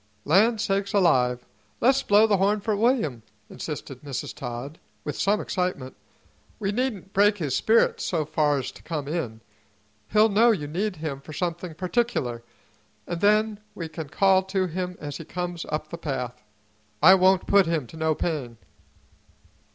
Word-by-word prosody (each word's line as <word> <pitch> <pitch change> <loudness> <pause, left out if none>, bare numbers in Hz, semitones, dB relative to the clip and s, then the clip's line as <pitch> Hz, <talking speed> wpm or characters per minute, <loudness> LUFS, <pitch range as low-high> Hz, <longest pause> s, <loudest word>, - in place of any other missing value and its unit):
"Land 210 +9 +4
sakes 200 -2 -1
alive! 125 -11 +3 0.3
Le's 260 +3 +4
blow 205 +2 +5
the 210 -3 +3
horn 200 +3 +2
for 210 +1 -1
William," 215 - +1 0.3
insisted 140 -4 -7
Mrs. 140 -3 -5
Todd, 125 +5 -7 0.2
with - - -4
some 205 +1 +1
excitement. 180 -9 -3 0.6
"He 200 -2 -1
needn't 210 -5 -3
break 205 +1 +4
his 145 -8 -2
spirit 225 +1 +3
so 160 -4 -1
far's 145 -3 0
to - - -15
come 150 -4 -4
in. 125 -9 -3 0.7
He'll 215 +1 +5
know 220 +4 +5
you 195 -10 +1
need 185 +7 -2
him 150 -3 -5
for 155 - -10
something 170 0 -3
particular, 180 - -1 0.6
an' 175 -1 -4
then 210 +2 +2 0.2
we 165 - -5
can 160 -2 -7
call 190 +3 +4
to 190 0 0
him 180 +1 -4
as 145 -1 -6
he 165 - -8
comes 175 +1 -5
up 150 0 -4
the 170 - -6
path. 125 -6 -4 0.6
I 185 +4 +10
won't 190 0 +4
put 200 -3 +4
him 165 -5 0
to 140 - -13
no 160 -1 0
pain." 140 -10 -3
175 Hz, 160 wpm, -25 LUFS, 150-200 Hz, 0.7 s, I